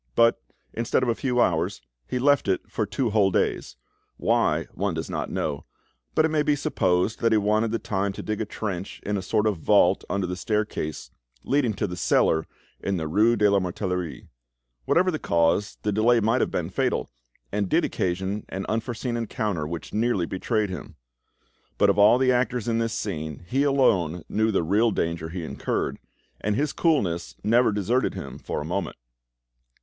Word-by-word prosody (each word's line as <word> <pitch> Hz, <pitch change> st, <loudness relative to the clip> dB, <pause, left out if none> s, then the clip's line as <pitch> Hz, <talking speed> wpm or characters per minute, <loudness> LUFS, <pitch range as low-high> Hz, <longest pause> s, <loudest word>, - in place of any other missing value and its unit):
But, 115 Hz, 0 st, +4 dB, 0.3 s
instead 115 Hz, +2 st, 0 dB
of 125 Hz, -, +1 dB
a -, -, +3 dB
few 125 Hz, +1 st, -1 dB
hours, 90 Hz, -2 st, +1 dB, 0.3 s
he -, -, -2 dB
left 140 Hz, -1 st, +3 dB
it 95 Hz, -, +1 dB
for 110 Hz, -, -2 dB
two 120 Hz, +2 st, -1 dB
whole 100 Hz, -2 st, +4 dB
days—why, 60 Hz, -8 st, -1 dB
one 95 Hz, -2 st, -1 dB
does 80 Hz, -, -4 dB
not -, -, -3 dB
know, 70 Hz, -, -3 dB, 0.5 s
but 155 Hz, -, +4 dB
it 160 Hz, -, 0 dB
may 155 Hz, -1 st, +2 dB
be 150 Hz, 0 st, +2 dB
supposed 95 Hz, -6 st, 0 dB
that 115 Hz, -, +2 dB
he 110 Hz, -, +5 dB
wanted 105 Hz, +2 st, +2 dB
the 115 Hz, -, 0 dB
time 100 Hz, -2 st, -1 dB
to -, -, -7 dB
dig 110 Hz, 0 st, -2 dB
a -, -, -1 dB
trench 100 Hz, -3 st, -5 dB
in 105 Hz, -, -1 dB
a 100 Hz, -, -1 dB
sort 105 Hz, +3 st, 0 dB
of 105 Hz, -4 st, +1 dB
vault 80 Hz, -, +3 dB
under 100 Hz, -1 st, 0 dB
the 90 Hz, 0 st, -3 dB
staircase 105 Hz, -6 st, -3 dB, 0.3 s
leading 130 Hz, -6 st, +1 dB
to 105 Hz, -, -1 dB
the 90 Hz, -3 st, -4 dB
cellar 80 Hz, -2 st, +2 dB, 0.3 s
in 100 Hz, -1 st, -1 dB
the 80 Hz, -2 st, -3 dB
rue 110 Hz, +9 st, +3 dB
de 105 Hz, -2 st, +3 dB
la 100 Hz, 0 st, +4 dB
Mortellerie. 90 Hz, -2 st, -3 dB, 0.6 s
Whatever 185 Hz, -, +3 dB
the 155 Hz, -, -3 dB
cause, 85 Hz, +4 st, +1 dB
the 105 Hz, -, +1 dB
delay 115 Hz, +3 st, +4 dB
might 115 Hz, +3 st, +2 dB
have -, -, +1 dB
been -, -, -3 dB
fatal, -, -, -1 dB, 0.4 s
and 100 Hz, -2 st, -1 dB
did -, -, +3 dB
occasion 95 Hz, +3 st, -2 dB
an 95 Hz, +1 st, -4 dB
unforeseen 120 Hz, +2 st, -2 dB
encounter 105 Hz, -8 st, -2 dB
which 85 Hz, +1 st, -6 dB
nearly 110 Hz, -5 st, +1 dB
betrayed 105 Hz, +3 st, -1 dB
him. 90 Hz, -, -7 dB, 0.8 s
But -, -, +5 dB
of -, -, -1 dB
all 105 Hz, +4 st, +7 dB
the 130 Hz, 0 st, +3 dB
actors 125 Hz, -2 st, 0 dB
in 115 Hz, -1 st, +1 dB
this 115 Hz, -1 st, -1 dB
scene 80 Hz, -5 st, -4 dB
he 135 Hz, +7 st, +1 dB
alone 95 Hz, -, +2 dB
knew 110 Hz, +1 st, +1 dB
the 100 Hz, -5 st, +1 dB
real 105 Hz, +8 st, +3 dB
danger 85 Hz, -4 st, -2 dB
he 85 Hz, +1 st, -5 dB
incurred, -, -, -2 dB, 0.4 s
and 105 Hz, 0 st, -1 dB
his 145 Hz, +4 st, 0 dB
coolness 95 Hz, -, 0 dB
never 115 Hz, +2 st, +4 dB
deserted 105 Hz, +5 st, 0 dB
him -, -, -7 dB
for -, -, -4 dB
a -, -, -5 dB
moment. 90 Hz, +1 st, -3 dB
105 Hz, 185 wpm, -25 LUFS, 90-115 Hz, 0.8 s, all